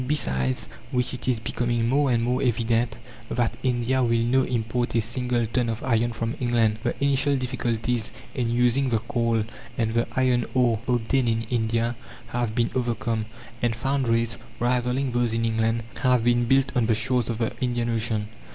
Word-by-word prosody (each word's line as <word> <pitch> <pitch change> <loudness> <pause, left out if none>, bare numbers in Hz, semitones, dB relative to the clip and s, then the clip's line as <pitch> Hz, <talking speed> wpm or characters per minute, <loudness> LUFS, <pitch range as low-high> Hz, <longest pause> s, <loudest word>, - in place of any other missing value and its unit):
Besides 65 - 0 0.2
which 125 0 -1
it 125 - -3
is 125 -3 +2
becoming 120 0 -1
more 140 +2 +2
and 115 -1 +2
more 125 +1 0
evident 115 -1 +1 0.3
that 120 -2 0
India 130 0 +1
will 115 -1 +2
no 130 +3 +3
import 120 -1 -1
a - - +4
single 120 +1 0
ton 115 +1 0
of 115 0 -4
iron 120 -2 +2
from 115 0 -3
England. 115 -3 +2
The 120 0 -1
initial 140 0 +3
difficulties 120 -2 -1 0.2
in 120 -4 -1
using 125 +3 +2
the 115 - +2
coal 115 -2 0 0.3
and 110 -1 0
the 115 0 +1
iron 125 -2 +2
ore 120 -4 +3
obtained 120 +1 +1
in 115 0 +1
India 115 0 0 0.3
have 120 -3 -2
been 115 -1 +1
overcome; 115 -3 -1 0.3
and 120 -2 +1
foundries, 115 -3 0 0.2
rivalling 125 +2 +1
those 120 -1 +1
in 115 0 0
England, 115 0 +1 0.2
have 125 -3 +3
been 120 0 +3
built 135 +2 +3
on 120 -3 +2
the 115 - +3
shores 120 +1 +1
of 115 - -1
the 115 -1 0
Indian 120 -2 0
Ocean. 110 -2 -1
120 Hz, 175 wpm, -25 LUFS, 115-125 Hz, 0.3 s, a